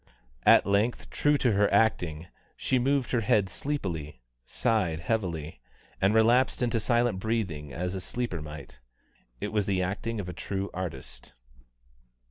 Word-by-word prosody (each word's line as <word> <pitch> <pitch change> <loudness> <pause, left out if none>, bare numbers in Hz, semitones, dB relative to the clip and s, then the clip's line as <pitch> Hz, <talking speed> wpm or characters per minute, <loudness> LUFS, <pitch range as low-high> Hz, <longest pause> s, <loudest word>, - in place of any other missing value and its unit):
At - - +7
length, 100 +5 0
true 145 0 +2
to 125 -3 +2
her 105 0 +2
acting, 90 -7 +2 0.3
she 130 - +1
moved 135 +1 +1
her 120 - +2
head 100 -2 +2
sleepily, 90 - -3 0.3
sighed 100 - 0
heavily, 85 -6 -2 0.4
and 100 +3 +3
relapsed 120 +3 +4
into 115 -1 +1
silent 120 -3 +1
breathing 95 -10 -2
as 90 +4 -3
a 95 - -4
sleeper 120 -7 -3
might. 75 -4 -9 0.6
It - - -3
was 105 -3 +1
the 95 -2 +1
acting 105 +4 -3
of 95 - -4
a 90 - -5
true 95 +2 -4
artist. 85 -8 -7
100 Hz, 145 wpm, -28 LUFS, 90-115 Hz, 0.6 s, At